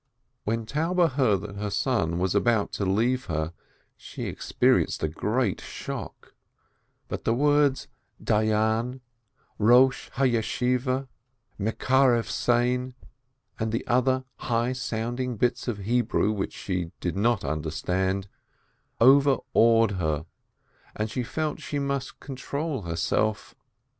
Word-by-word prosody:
When 115 +1 -1
Taube 165 +6 +1
heard 125 -8 +2
that 100 0 -8
her 105 0 -3
son 100 -7 0
was 90 +1 0
about 105 0 +2
to 100 - -2
leave 120 +7 +1
her, 80 0 -2 0.4
she - - -8
experienced - - +1
a - - +3
great 105 +7 -1
shock, - - -7 0.7
but - - -5
the 115 - +1
words, 145 0 +2 0.3
Dayan, 110 +4 +1 0.6
Eosh 125 +4 +4
Yeshiveh, 125 +1 +1 0.5
mekarev 120 +3 +2
sein, 125 +1 0 0.6
and 110 +1 0
other 130 +1 +2
high 120 +1 0
sounding 120 0 -3
bits 120 +4 0
of 120 -4 -1
Hebrew, 110 0 +1
which 100 -2 -3
she 90 -3 -3
did 90 - -2
not 110 -2 +1
understand, 90 +6 -1 0.7
overawed 115 -4 +5
her, 80 -1 -1 0.7
and 110 0 -2
she 125 - -2
felt 155 +5 -3
she 145 - -4
must 140 -1 -3
control 140 +1 -4
herself. 85 +5 -1
115 Hz, 115 wpm, -26 LUFS, 105-130 Hz, 0.7 s, overawed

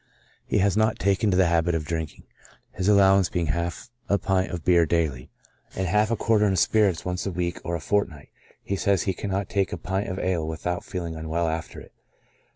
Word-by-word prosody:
He - - +1
has 100 -1 +2
not 110 +1 +2
taken 100 +2 +1
to 90 - +2
the 95 - +5
habit 85 0 +2
of 80 -2 -2
drinking, 80 -1 -4 0.5
his 95 - -3
allowance 95 -3 +5
being 85 -1 -1
half 85 +7 -4 0.2
a 100 - +3
pint 95 0 0
of 85 -2 -6
beer 85 -2 +5
daily, 80 -6 -1 0.5
and 95 - -1
half 105 +4 +2
a 115 - +1
quartern 105 -3 +2
of - - -1
spirits 100 -1 +2
once 90 +2 -3
a - - -2
week 90 0 -2
or 85 0 -2
a - - -3
fortnight; 90 -4 -2 0.3
he 100 - -2
says 100 -1 +1
he 95 - 0
cannot 100 +1 -3
take 100 -1 0
a - - -3
pint 95 +4 -3
of 95 - -4
ale 90 -5 -1
without 85 +2 -3
feeling 85 -3 -5
unwell 80 +1 -2
after 80 +1 -4
it. - - -14
90 Hz, 210 wpm, -25 LUFS, 85-100 Hz, 0.5 s, the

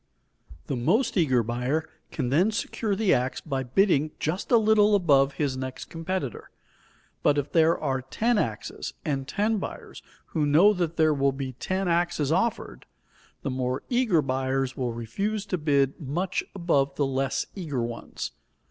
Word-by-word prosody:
The - - -2
most 175 - +1
eager 130 - +3
buyer 125 +7 -1 0.2
can 130 -5 -2
then 170 - +3
secure 215 -1 -2
the 210 -1 +3
ax 125 +1 0
by 135 -4 -3
bidding 155 +3 +2
just 165 +5 -2
a 240 - +7
little 215 -1 +4
above 140 -7 +4
his 140 -3 -1
next 130 0 -6
competitor. 165 - -4 0.7
But 145 - +3
if 145 0 -2
there 165 0 +4
are 135 -3 -1
ten 220 - 0
axes - - -4
and 135 -4 -2
ten 215 +3 0
buyers - - -7 0.3
who 150 -3 +1
know 170 +9 +6
that 170 -4 -2
there 155 -1 +4
will 140 -1 +1
be 135 -1 -5
ten 185 +9 -2
axes 170 -4 +1
offered, 210 +7 -1 0.6
the 135 - -2
more 130 0 -2
eager 240 - +2
buyers 130 0 -1
will 125 -2 -2
refuse 195 - -3
to 185 -3 -2
bid 140 -3 +1
much 175 +7 -2
above 140 -7 +1
the 145 - +1
less 135 0 -1
eager 150 -10 -3
ones. 115 0 -5
150 Hz, 160 wpm, -26 LUFS, 135-185 Hz, 0.7 s, a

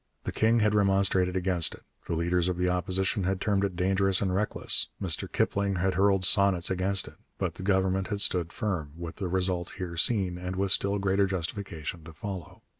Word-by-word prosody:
The - - -3
king 115 +1 +2
had 105 0 +2
remonstrated 95 -2 +2
against 90 -2 +1
it, - - -20 0.2
the - - -1
leader 85 +2 +1
of 90 0 0
the 90 0 0
Opposition 95 +3 0
had 95 0 0
termed 100 -1 +1
it 95 -3 -2
dangerous 95 +1 +1
and 95 -2 -1
reckless, 105 +3 +1
Mr 85 -6 -2
Kipling 100 -1 0
had 95 +1 0
hurled 95 0 +3
sonnets 95 -2 +4
against 95 +1 -1
it. - - -13 0.2
But - - -2
the - - -10
Government 95 0 +1
had 105 -2 -3
stood 85 -4 +1
firm, 90 - -3
with 85 -1 -7
the 95 - -3
result 90 -1 -1
here 90 -3 -5
seen, 90 -2 +2
and 90 +1 -4
with 95 0 0
still 100 +1 +2
greater 100 0 +1
justification 90 -3 -4
to 85 - -11
follow. 95 0 -7
95 Hz, 195 wpm, -28 LUFS, 90-100 Hz, 0.2 s, sonnets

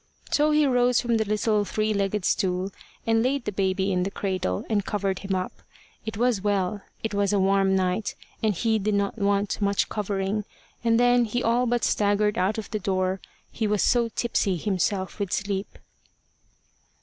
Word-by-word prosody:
So 300 +1 +3
he 300 0 +4
rose 250 -2 +3
from 235 -1 +1
the 220 - 0
little 210 0 +1
three 215 +1 -1
legged 200 -1 -1
stool, 185 +1 0 0.3
and 225 0 +3
laid 260 +1 0
the - - -1
baby 190 0 0
in 180 -1 +1
the 190 - 0
cradle, 185 - -2
and 210 -3 +1
covered 195 -2 -1
him 195 -1 -2
up 185 0 -2 0.6
it 220 -1 -4
was 240 -3 +2
well 205 0 0 0.2
it 225 - -2
was 200 0 +1
a 205 - +2
warm 195 0 +3
night, 185 +2 0 0.3
and 215 -3 +1
he 220 +4 +1
did 210 +1 0
not 200 +3 -1
want 200 +1 0
much 200 -1 +1
covering 205 0 -2 0.4
and 230 -1 +3
then 245 0 +4
he 245 +3 -2
all 240 +2 +2
but 240 0 0
staggered 210 0 +2
out 195 +4 +1
of 220 - -6
the 215 - -1
door, 185 -1 -1 0.3
he 220 - -1
was 210 -1 +1
so 235 -1 +3
tipsy 205 -5 0
himself 190 +2 -1
with 200 -3 -2
sleep. 200 0 -2
205 Hz, 185 wpm, -25 LUFS, 195-225 Hz, 0.6 s, he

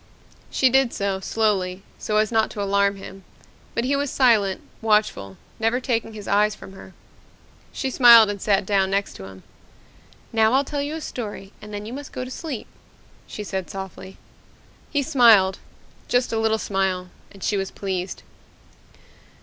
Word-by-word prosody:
She 260 -2 +3
did 265 -2 +3
so, 200 -1 -1
slowly, 195 -3 -1 0.2
so 210 - -1
as 215 +1 +2
not 220 -1 +2
to 205 - -6
alarm 200 0 +2
him. 195 0 -11 0.5
But 235 - 0
he 270 +3 +1
was 285 0 -1
silent, 220 -8 +3 0.2
watchful, 210 - +1 0.2
never 225 +2 +1
taking 230 -3 -2
his 210 -2 -9
eyes 210 +1 +2
from 190 - -12
her. 190 -1 -13 0.8
She 265 - -3
smiled 235 -4 +8
and 205 -1 -4
sat 200 -2 +2
down 195 -1 +2
next 200 +1 -1
to 95 - -9
him. 95 -1 -12 0.9
"Now 220 +1 +3
I'll 270 +2 +4
tell 285 +1 -3
you 290 +2 -3
a 320 - -6
story 210 -7 -7
and 210 - -10
then 205 0 -6
you 225 - -7
must 285 +1 -8
go 255 - -4
to 255 - -9
sleep," 270 -4 -5 0.6
she 210 - -6
said 190 -3 -4
softly. 190 0 -8 0.7
He 285 -2 0
smiled 220 -8 +5 0.5
just 245 -1 +1
a 225 - +1
little 220 0 +2
smile 190 -3 -2 0.2
and 195 -2 -12
she 210 - 0
was 195 -1 -2
pleased. 190 -2 -4
210 Hz, 170 wpm, -23 LUFS, 195-240 Hz, 0.9 s, smiled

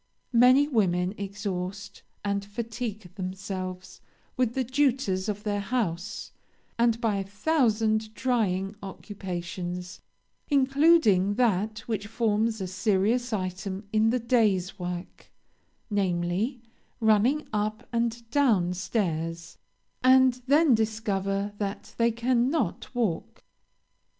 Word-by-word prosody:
Many 255 +4 +6
women 185 -8 +1
exhaust 200 -1 -5 0.2
and 200 0 0
fatigue 220 -2 -5
themselves 185 -1 -6 0.3
with 250 -3 0
the 265 - +1
duties 255 -7 +1
of 210 0 -3
their 205 -1 -1
house, 200 -2 -3 0.5
and 230 -1 +3
by 220 -4 +1
a 195 - -1
thousand 220 -1 +1
trying 205 -6 0
occupations, 180 -2 -6 0.5
including 270 - +4
that 215 -2 +1
which 210 -3 -2
forms 220 0 0
a 190 - -2
serious 210 +6 +1
item 190 0 -3
in 220 +1 +4
the 245 - +2
day's 210 -6 +1
work, 175 0 -6 0.6
namely, 195 +5 0 0.4
running 225 +7 +3
up 215 +1 -2
and 235 0 -1
down 220 -11 +3
stairs, 170 -4 -3 0.4
and 255 -1 +5
then 295 0 +5
discover 205 -3 -1
that 200 -1 -4
they 230 0 +4
cannot 240 - 0
walk. 215 -9 -2
210 Hz, 105 wpm, -27 LUFS, 190-235 Hz, 0.6 s, Many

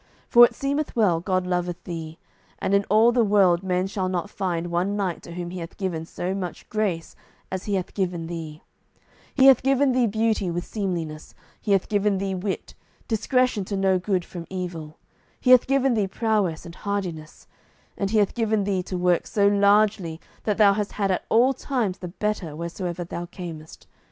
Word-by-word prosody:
For 240 - +8
it - - -3
seemeth 280 +2 -2
well 195 -8 +3
God 185 +1 -1
loveth 180 -1 -2
thee, 165 -2 -6 0.4
and 195 - -1
in 200 0 +3
all 220 +4 +5
the 240 -1 +3
world 195 -5 +4
men 185 -1 0
shall 190 -1 -2
not 185 +3 -3
find 175 -3 -2
one 180 +4 0
knight 190 -4 -2
to 170 - -10
whom 175 0 -5
He 185 - -6
hath 165 0 -8
given 170 -5 -3
so 180 +2 -3
much 185 -3 -5
grace 200 -7 -2 0.4
as 190 0 -4
He 205 - 0
hath 185 -2 -3
given 175 -4 -2
thee; 160 -2 -7 0.7
He 265 - +5
hath 270 -3 +8
given 270 +1 +3
thee 250 -2 +2
beauty 220 -3 0
with 175 +1 -3
seemliness; 170 -7 -4 0.3
He 205 - +1
hath 195 - +2
given 205 -1 +1
thee 195 0 -2
wit, 190 +1 -4 0.3
discretion 245 -1 +1
to 200 +1 -3
know 190 -1 +2
good 185 -1 -1
from 170 -2 -8
evil; 175 -5 -6 0.4
He 255 - +2
hath 255 -2 +7
given 270 -1 +2
thee 210 -4 +1
prowess 205 -6 0
and 170 - -9
hardiness; 180 -6 -5 0.5
and 195 - -2
He 220 - +1
hath 205 -2 +2
given 220 -3 +1
thee 195 -2 0
to 180 0 -5
work 180 -1 +1
so 200 -2 +2
largely 200 -4 +3 0.3
that 210 -2 0
thou 205 -2 +6
hast 205 0 -3
had 200 -2 0
at 185 - -1
all 250 +4 +4
times 245 -8 -2
the 180 - -6
better 190 -4 -3
wheresoever 170 +2 -4
thou 175 0 -6
camest. 165 -4 -9
190 Hz, 190 wpm, -24 LUFS, 175-215 Hz, 0.7 s, For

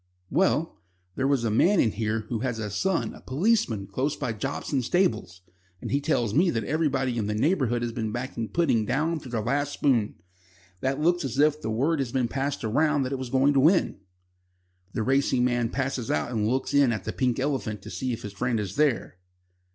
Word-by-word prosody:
"Well, 165 - +1 0.3
there 135 - 0
was 140 -4 +1
a 115 - 0
man 175 - +4
in 110 - +3
here 110 +1 -1
who 110 +1 -4
has 120 -1 -2
a 105 -2 -4
son 190 - 0
a - - -13
policeman 135 - +1
close 130 +9 -2
by 125 -5 -3
Jobson's 130 +2 -2
stables, 170 - 0 0.4
and - - -6
he 140 +2 +1
tells 120 -8 0
me 175 +8 +4
that 115 -7 -1
everybody 135 -3 0
in 105 - -1
the 105 - -1
neighbourhood 120 - +1
has 120 - -2
been 110 -2 -3
backing 120 -1 -4
Pudding 165 -10 +2
down 155 +6 0
to 135 - -11
their 115 -3 -2
last 145 +4 0
spoon. 120 -9 +1 0.6
That 135 +5 -1
looks 175 +2 +2
as 135 -1 -4
if 150 +1 +3
word 135 +9 0
had 130 -4 -2
been 130 -3 +1
passed 135 +2 -3
round 145 +5 +2
that 130 - -4
it 135 - -2
was 130 -2 -5
going 135 +3 +3
to 140 - +3
win." 160 - +3 0.9
The 110 - -1
racing 130 -1 +2
man 120 -2 +1
passes 130 -2 -2
out 75 +10 0
and 110 -3 0
looks 130 +3 -1
in 140 -3 +5
at 105 -5 -3
the - - -4
"Pink 125 -2 0
Elephant" 115 -8 -2
to - - -9
see 130 -1 -3
if 115 - -5
his 105 - -6
friend 120 +2 -1
is 100 0 -5
there. 140 -11 +1
130 Hz, 210 wpm, -26 LUFS, 115-145 Hz, 0.9 s, in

